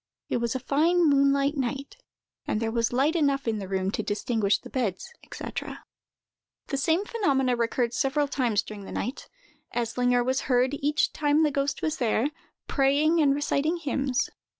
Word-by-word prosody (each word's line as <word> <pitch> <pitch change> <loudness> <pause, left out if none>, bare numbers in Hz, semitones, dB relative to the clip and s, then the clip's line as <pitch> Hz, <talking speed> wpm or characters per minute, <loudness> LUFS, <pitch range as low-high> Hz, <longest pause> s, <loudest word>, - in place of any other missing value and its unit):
It - - +1
was 235 +1 -1
a - - 0
fine 320 +6 +2
moonlight 280 0 +3
night, 270 - -3 0.5
and 215 - 0
there 225 0 -1
was 230 0 0
light 275 +7 +2
enough 280 -5 +1
in 220 -2 0
the 195 - -6
room 190 0 -1
to 220 - -2
distinguish 210 0 0
the - - -13
beds, 240 - -2 0.2
&c. - - -6 1.2
The 275 - -1
same 325 +8 +1
phenomena 270 - +1
recurred 235 0 0
several 280 +4 +1
times 245 -7 0
during 205 -2 -9
the - - -9
night: 255 - -4 0.5
Eslinger 245 +1 +1
was 260 +1 +1
heard, 250 +1 +3
each 295 +2 +1
time 300 +1 +2
the 300 - +2
ghost 280 0 -1
was 315 0 0
there, 240 +3 +1 0.3
praying 295 +4 +2
and 280 -2 +4
reciting 290 +3 0
hymns. 275 -4 -1
270 Hz, 170 wpm, -26 LUFS, 235-290 Hz, 1.2 s, and